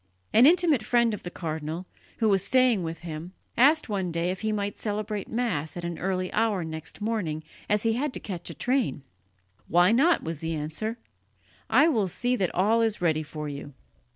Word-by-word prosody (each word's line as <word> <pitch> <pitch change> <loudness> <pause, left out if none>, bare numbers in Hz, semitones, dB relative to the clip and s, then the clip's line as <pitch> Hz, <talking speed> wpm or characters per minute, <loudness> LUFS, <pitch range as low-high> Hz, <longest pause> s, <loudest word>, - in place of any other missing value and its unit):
An 240 +4 +8
intimate 330 -6 +4
friend 235 +1 +2
of 210 - -5
the 175 - -6
cardinal, 160 0 -4 0.3
who 225 - +2
was 195 -3 +4
staying 255 -6 +3
with 165 -1 -5
him, 165 +1 -7 0.2
asked 295 +6 +4
one 195 -5 -2
day 170 +2 0
if 185 - -6
he 220 0 0
might 205 -1 -2
celebrate 210 -1 -3
Mass 190 -11 -2
at 175 - -5
an 170 -1 -4
early 185 0 -2
hour 215 -5 +1
next 160 +4 -7
morning, 195 -9 -2 0.3
as 210 0 +2
he 225 -1 +2
had 275 +5 -1
to - - -3
catch 185 -6 -6
a - - -7
train. 245 - 0 0.6
"Why 175 +3 +5
not?" 305 +9 +4
was 165 -2 -4
the 165 0 -3
answer, 160 +10 -3 0.7
"I 270 +8 +6
will 225 - +2
see 245 +8 0
that 190 -7 0
all 215 +5 +3
is 225 -2 +1
ready 160 -3 +1
for 150 0 -6
you." 140 -1 -7
200 Hz, 195 wpm, -27 LUFS, 165-230 Hz, 0.7 s, An